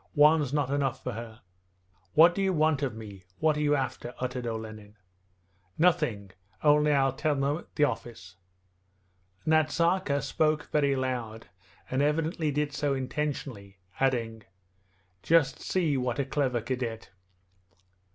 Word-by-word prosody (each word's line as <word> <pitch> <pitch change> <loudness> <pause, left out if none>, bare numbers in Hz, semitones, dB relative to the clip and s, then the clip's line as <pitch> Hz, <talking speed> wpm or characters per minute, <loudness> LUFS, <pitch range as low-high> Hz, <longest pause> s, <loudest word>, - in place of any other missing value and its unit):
One's 150 -2 +5
not 145 -2 0
enough 135 -2 -1
for 125 - -3
her.' 115 0 -8 0.7
'What 165 +2 +7
do 195 - -2
you 190 -1 +1
want 155 -3 +2
of 130 -6 -2
me, 100 -4 -10
what 155 -1 +2
are - - -3
you 145 0 +3
after?' 130 -3 -4
uttered 125 -1 -3
Olenin. 110 -2 -7 0.8
'Nothing; 150 - +1 0.3
only 150 0 +4
I'll 135 -2 +3
tell 150 +2 0
them 140 +3 0
at - - -18
the 150 - +2
office.' 115 -7 -3 1.1
Nazarka 160 -1 +2
spoke 155 +2 0
very 140 -2 +2
loud, 120 -4 -4 0.4
and 130 +1 -1
evidently 155 +2 0
did 145 0 -1
so 145 -2 0
intentionally, 130 -7 -4 0.2
adding: 115 -4 0 0.8
'Just 160 -5 +3
see 165 -7 0
what 125 -2 -1
a 140 - 0
clever 130 -3 0
cadet!' 120 -2 -4
140 Hz, 135 wpm, -28 LUFS, 120-150 Hz, 1.1 s, What